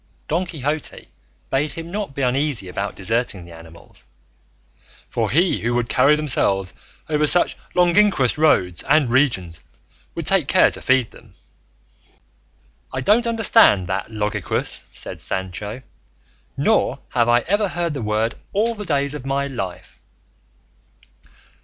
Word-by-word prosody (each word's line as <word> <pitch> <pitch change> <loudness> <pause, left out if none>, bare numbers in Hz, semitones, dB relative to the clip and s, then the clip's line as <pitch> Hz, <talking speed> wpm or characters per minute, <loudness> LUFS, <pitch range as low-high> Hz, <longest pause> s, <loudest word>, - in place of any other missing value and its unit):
Don 175 +4 -1
Quixote 150 -2 -4 0.4
bade 140 +2 0
him 165 +1 -8
not 200 -8 -4
be 140 - -2
uneasy 130 -4 0
about 100 +2 -4
deserting 105 -2 -2
the 85 - -13
animals, 80 0 -15 1.0
"for - - -1
he 175 +6 +2
who 120 +1 -1
would 120 -1 -1
carry 140 +4 +4
themselves 100 - 0 0.3
over 150 -1 +1
such 175 - +3 0.2
longinquous 180 - +3
roads 90 - +2
and 145 -4 +4
regions 95 - +1 0.5
would - - -4
take - - +2
care - - +4
to - - -7
feed 130 -3 +2
them." 110 -5 -18 1.6
"I 130 - -3
don't 220 - +3
understand 225 - +4
that 95 +4 -3
logiquous," 105 -2 -2
said - - -7
Sancho, 100 +6 -5 0.7
"nor - - +2
have 120 -2 +1
I 120 0 +4
ever 205 - +1
heard 170 -3 -2
the 140 - -4
word 110 +1 0 0.2
all 225 +4 +1
the 210 -2 -7
days 140 -3 0
of 150 - -7
my 135 +1 -1
life." 100 -10 -6
135 Hz, 135 wpm, -21 LUFS, 105-160 Hz, 1.6 s, carry